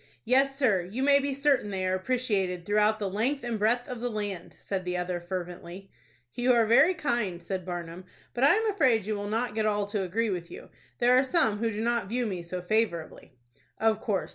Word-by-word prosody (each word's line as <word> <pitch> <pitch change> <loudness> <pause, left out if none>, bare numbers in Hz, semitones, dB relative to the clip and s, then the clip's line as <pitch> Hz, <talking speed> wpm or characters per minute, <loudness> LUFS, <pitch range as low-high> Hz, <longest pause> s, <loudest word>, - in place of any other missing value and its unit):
"Yes, 270 +3 +2
sir, 225 -10 +3
you 205 +9 -4
may 280 0 +5
be 280 0 -2
certain 275 -5 +1
they 190 -2 -2
are 185 - 0
appreciated 190 -4 -1
throughout 210 +2 +2
the 205 -2 -2
length 240 +9 -1
and 235 -3 -3
breadth 235 +4 +1
of 250 -2 -6
the 245 - -1
land," 205 -5 -5
said 195 -2 -4
the 180 0 -2
other, 180 0 -2
fervently. 180 +1 -7 0.4
"You 250 +1 +2
are 230 -2 +4
very 270 +11 +5
kind," 240 - -1
said 185 +1 -5
Barnum; 175 0 -6 0.3
"but 245 - -1
I 280 - +6
am 440 0 +1
afraid 255 - +2
you 215 0 -2
will 205 0 -4
not 225 +1 -1
get 215 0 0
all 205 -1 0
to 205 0 -2
agree 210 +4 -1
with 175 -2 -4
you. - - -11 0.3
There 245 +1 +4
are 255 - +5
some 260 - +1
who 230 0 0
do 215 0 -4
not 235 -2 0
view 245 +2 -1
me 190 -5 -3
so 175 +1 -6
favorably." 180 - -2 0.4
"Of 220 0 +2
course. 205 -4 -1
215 Hz, 215 wpm, -28 LUFS, 185-245 Hz, 0.4 s, I